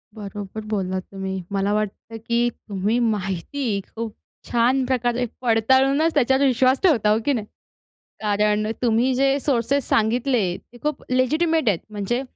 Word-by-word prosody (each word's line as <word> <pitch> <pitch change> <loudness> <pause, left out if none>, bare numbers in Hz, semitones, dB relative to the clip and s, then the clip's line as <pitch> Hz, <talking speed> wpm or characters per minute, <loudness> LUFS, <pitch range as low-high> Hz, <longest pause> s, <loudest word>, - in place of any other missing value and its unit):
बरोबर 205 0 -7
बोललात 190 -3 -1
तुम्ही. 190 -1 -4
मला 200 +1 0
वाटतं 215 +2 -3
की 235 +1 +2
तुम्ही 210 +1 -2
माहिती 210 +4 -2 0.3
खूप 225 -1 -4 0.4
छान 250 +2 +2
प्रकारे 245 -1 0 0.2
पडताळूनच 265 +7 +3
त्याच्यावर 265 0 +3
विश्वास 260 +1 +3
ठेवता, 235 - +4
हो 215 - +4
की 285 - +3
नाही? 215 -4 -2 0.8
कारण 210 0 +1 0.2
तुम्ही 240 +2 +2
जे 270 +2 +2
सोर्सेस 275 0 0
सांगितले 230 0 +2
ते 240 - -19
खूप 300 -1 -2
लेजिटिमेट 310 +3 +2
आहेत. 190 - +2
म्हणजे 210 +5 -2
235 Hz, 135 wpm, -22 LUFS, 210-265 Hz, 0.8 s, ठेवता